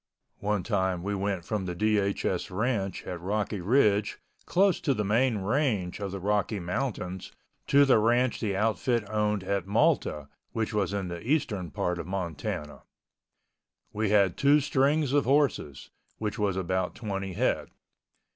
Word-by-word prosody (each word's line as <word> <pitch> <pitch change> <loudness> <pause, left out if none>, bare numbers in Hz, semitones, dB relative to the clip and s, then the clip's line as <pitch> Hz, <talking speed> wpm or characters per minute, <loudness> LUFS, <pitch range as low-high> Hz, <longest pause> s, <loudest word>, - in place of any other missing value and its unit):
One 105 -2 -1
time 95 -5 0
we 100 +1 -2
went 95 -3 -2
from 105 -4 -2
the 90 - -3
DHS 100 0 0
ranch 100 -1 -2
at 90 -2 -5
Rocky 100 +1 -2
Ridge 105 -1 +2 0.3
close 195 0 +3
to 140 -4 +1
the 105 - -1
main 115 +3 +2
range 105 -4 0
of 100 -1 -3
the 100 +1 -5
Rocky 105 +2 0
Mountains 90 0 -3 0.4
to 140 0 +6
the 130 -5 +5
ranch 120 +3 +2
the 105 -4 -1
outfit 115 +1 0
owned 105 -2 0
at 95 -1 -2
Malta, 105 - +1 0.3
which 110 -1 -2
was 100 -4 0
in 100 -3 -3
the 85 -1 -6
eastern 110 - -1
part 90 +4 -2
of - - -5
Montana. 85 -5 -4 1.1
We 110 0 0
had 100 -3 +3
two 145 +2 +5
strings 140 +1 +1
of 145 -1 +3
horses, 130 - 0 0.3
which 110 +1 -3
was 100 -3 0
about 95 0 -1
twenty 95 -4 -4
head. - - 0
105 Hz, 155 wpm, -28 LUFS, 95-120 Hz, 1.1 s, to